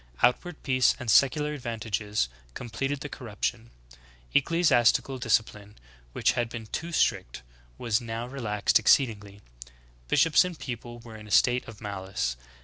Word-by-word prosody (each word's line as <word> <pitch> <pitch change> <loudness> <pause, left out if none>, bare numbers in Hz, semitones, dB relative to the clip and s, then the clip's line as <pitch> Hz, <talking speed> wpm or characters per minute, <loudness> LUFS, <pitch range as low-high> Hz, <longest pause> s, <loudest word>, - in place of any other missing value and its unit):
Outward 150 +7 +1
peace 130 -2 +3
and 125 -4 -1
secular 150 +4 +3
advantages 110 - -2 0.3
completed 135 +4 -4
the - - -4
corruption. 115 -2 -4 0.6
Ecclesiastical 135 -4 +3
discipline, 105 -3 -1 0.4
which - - +2
had 120 -1 -2
been 115 -1 -7
too 165 +10 -5
strict, 145 - 0 0.3
was 115 -2 0
now 115 0 -5
relaxed 115 -7 +1
exceedingly; 105 -4 +2 0.7
bishops 165 - +4
and 180 -2 -5
people 120 -2 -7
were 115 -2 -11
in 105 0 -12
a - - -13
state 125 +4 +3
of 110 -2 -11
malice. 95 - -3
120 Hz, 135 wpm, -27 LUFS, 105-135 Hz, 0.7 s, bishops